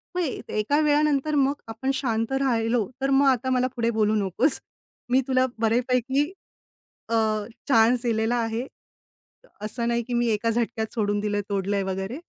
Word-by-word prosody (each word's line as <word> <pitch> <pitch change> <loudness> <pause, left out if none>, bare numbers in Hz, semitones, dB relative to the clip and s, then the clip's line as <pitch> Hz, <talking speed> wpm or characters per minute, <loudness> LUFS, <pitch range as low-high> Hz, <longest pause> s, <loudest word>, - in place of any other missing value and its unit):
मग 360 - +1
ए 280 - -3 0.2
एका 285 +8 +1
वेळानंतर 300 -1 +2
मग 275 0 +3
आपण 225 +4 -2
शांत 230 -3 -1
राहिलो 230 -4 +1
तर 270 - +1
मग 275 +1 +4
आता 260 -1 +2
मला 255 0 +2
पुढे 230 -1 0
बोलू 215 -1 +1
नकोस. 190 - +1 0.5
मी 260 - +5
तुला 255 -1 +3
बऱ्यापैकी 250 +6 +1 0.8
अ, - - +2 0.5
चान्स 235 -1 +4
दिलेला 225 0 +1
आहे. 230 +1 -2 1.0
असं 230 +2 -3
नाही 235 0 0
की 245 - -6
मी 240 0 +1
एका 220 +2 0
झटक्यात 225 -1 -1
सोडून 205 -3 0
दिलंय, 205 0 -1
तोडलंय 200 0 0
वगैरे. 190 +7 -4
235 Hz, 155 wpm, -25 LUFS, 220-265 Hz, 1.0 s, मी